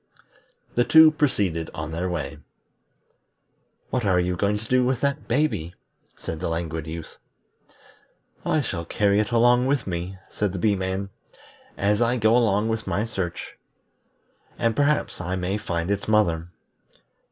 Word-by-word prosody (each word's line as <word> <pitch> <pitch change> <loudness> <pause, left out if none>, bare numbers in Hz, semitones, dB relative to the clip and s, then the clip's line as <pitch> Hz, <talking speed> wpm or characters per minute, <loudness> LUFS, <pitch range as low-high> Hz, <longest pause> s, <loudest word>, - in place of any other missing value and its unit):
The 120 - +3
two 160 +3 +8
proceeded 100 - 0
on 80 -2 -5
their 85 +3 -2
way. 80 -3 -4 1.5
"What 125 -2 0
are 95 -3 +3
you 90 0 0
going 100 +3 +1
to 105 - -8
do 125 +1 +3
with 125 0 +1
that 140 +1 -1
baby?" 115 - 0 0.4
said 80 - -6
the 90 - -2
Languid 80 -1 -3
Youth. 80 0 -7 1.3
"I 155 - +1
shall 85 -10 -3
carry 100 +4 +2
it 105 - 0
along 120 +2 +4
with 140 0 +1
me," 90 +1 -4
said 105 -3 -2
the - - -3
Bee 105 +2 +2
man, 95 +1 -3 0.7
"as 105 +2 +1
I 120 +1 +2
go 110 0 +4
on 110 -3 +2
with 110 0 -2
my 105 - 0
search, 95 -6 -5 1.0
and 115 -1 +1
perhaps 145 -7 +1
I 90 +1 -2
may 95 +3 -2
find 85 -1 -2
its 100 0 -2
mother. 85 -7 +2
100 Hz, 150 wpm, -24 LUFS, 90-120 Hz, 1.5 s, two